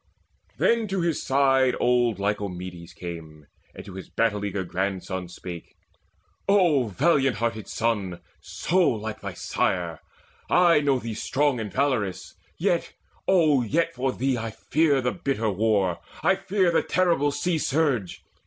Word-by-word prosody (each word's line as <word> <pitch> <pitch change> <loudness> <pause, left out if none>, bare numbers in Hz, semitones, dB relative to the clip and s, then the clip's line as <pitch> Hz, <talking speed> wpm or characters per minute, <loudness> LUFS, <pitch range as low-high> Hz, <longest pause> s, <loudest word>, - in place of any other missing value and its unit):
Then 230 -2 +2
to 190 -2 -1
his 170 -2 0
side 135 -2 +3
old 120 -3 +2
Lycomedes 95 -4 -4
came, 80 -4 -9 0.3
And - - -9
to 95 - -10
his 95 -1 -9
battle 105 -3 0
eager 100 -1 -2
grandson 95 0 -3
spake: 85 -1 -9 0.7
"O 170 - +4
valiant 135 - +2
hearted 110 -1 -2
son, 105 -6 -1 0.2
so 180 +3 -1
like 110 -1 -4
thy - - -5
sire, 85 -4 -1 0.5
I 175 -3 +5
know 140 -2 +2
thee 115 -2 -5
strong 135 +4 0
and 105 -3 -4
valorous; 110 -5 -1 0.2
yet, - - 0 0.3
O 155 -8 +4
yet 165 +8 0
For 130 +1 -1
thee 130 -1 -1
I 115 0 -3
fear 145 +5 +1
the 125 0 0
bitter 135 - -1
war; 100 -3 +1 0.2
I - - +5
fear 190 -3 +1
The 165 - +3
terrible 170 -6 +2
sea 170 +2 -1
surge. 135 - 0
120 Hz, 145 wpm, -25 LUFS, 100-145 Hz, 0.7 s, I